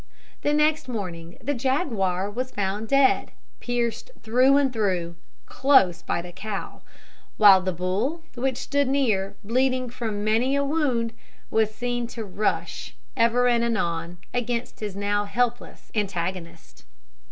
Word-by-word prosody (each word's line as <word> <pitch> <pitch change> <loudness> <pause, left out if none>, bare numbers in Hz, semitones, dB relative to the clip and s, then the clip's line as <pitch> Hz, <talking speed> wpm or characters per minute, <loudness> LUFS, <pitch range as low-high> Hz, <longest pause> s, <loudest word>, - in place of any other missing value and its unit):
The 290 - +1
next 305 0 +2
morning 175 -8 -6
the 290 - 0
jaguar 235 - 0
was 250 +5 -3
found 205 0 -2
dead, 275 +2 +3 0.3
pierced 240 - -2
through 255 +5 +4
and 275 -2 +2
through, 180 -6 -1 0.3
close 195 -11 +4
by 170 - -2
the 175 - -9
cow; 200 +2 -6 0.6
while 195 -3 +8
the 185 0 -1
bull, 195 - -2
which 255 0 -1
stood 285 +1 0
near, 225 -8 +1
bleeding 255 +2 +1
from 220 -4 -3
many 230 +6 +2
a 280 - +2
wound, 270 -6 0 0.4
was 220 -1 +3
seen 245 +1 -2
to 225 - -3
rush, 200 +2 -2 0.2
ever 235 +2 +3
and 235 -1 +3
anon, 170 -7 -1 0.2
against 245 0 -2
his 210 -3 -5
now 205 +1 0
helpless 240 +3 -2
antagonist. 175 -4 -4
230 Hz, 135 wpm, -25 LUFS, 195-255 Hz, 0.6 s, while